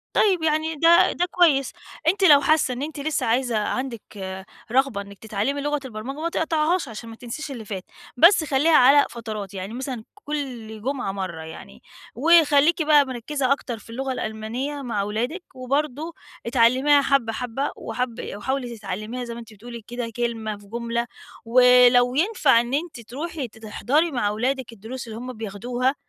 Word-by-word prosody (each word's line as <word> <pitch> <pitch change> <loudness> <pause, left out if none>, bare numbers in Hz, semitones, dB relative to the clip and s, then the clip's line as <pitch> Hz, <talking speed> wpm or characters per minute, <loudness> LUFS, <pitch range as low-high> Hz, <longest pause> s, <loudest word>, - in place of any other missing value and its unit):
طيب، 370 -6 +3
يعني 315 +1 +1
ده 330 +3 +5
ده 355 - 0
كويس، 290 -7 +3 0.4
أنتِ 390 +3 +2
لو 290 -5 +8
حاسّة 290 -3 +2
إن 250 - -6
أنتِ 295 0 -5
لسّه 305 +2 -1
عايزة 235 0 +1
عندِك 210 -5 -4 0.3
رغبة 260 -5 +2
إنِّك 200 0 -12
تتعلّمي 220 +7 -2
لغة 295 0 -1
البرمجة، 255 +5 -6
ما 335 +1 -1
تقطعيهاش 320 0 0
عشان 225 +1 -8
ما 225 - -9
تنسيش 250 +6 -7
اللي 235 -5 -7
فات، 195 -3 -5 0.3
بس 335 +3 +6
خلّيها 300 +3 +3
على 280 +3 +6
فترات، 215 -4 -6
يعني 195 +3 -6
مثلًا 255 -3 -5
كل 255 - -6
جمعة 255 -5 -2
مرّة 185 -4 -5
يعني. 65 - -11 0.3
وخلّيكِ 315 +2 +5
بقى 295 -2 +5
مركّزة 260 +2 -2
أكتر 255 -4 -1
في - - -17
اللغة 265 +3 -3
الألمانية 240 +6 -4
مع 230 -6 -2
ولادِك، 240 - -3
وبرضه 290 +5 -2 0.3
اتعلّميها 255 +5 +4
حَبّة، 270 -5 +1
حَبّة 250 +4 -3
وحَاب 250 -2 -4 0.2
وحاولي 245 +2 -3
تتعلّميها 215 +5 -5
زي 235 -1 -6
ما 235 - -8
أنتِ 225 -2 -12
بتقولي 235 +2 -10
كده 240 -1 -4
كلمة 225 -3 -2
في 205 0 -17
جُملة، 235 +1 -2 0.4
ولو 250 +1 +6
ينفع 305 - +4
إن 240 +2 -6
أنتِ 300 -3 -2
تروحي 280 +4 -5
ت 220 - -19
تحضري 280 +9 0
مع 210 -6 0
ولادِك 250 +3 -2
الدروس 230 +4 -8
اللي 220 0 -7
هم 250 +1 -6
بياخدوها، 240 +5 -2
250 Hz, 165 wpm, -23 LUFS, 225-290 Hz, 0.4 s, لو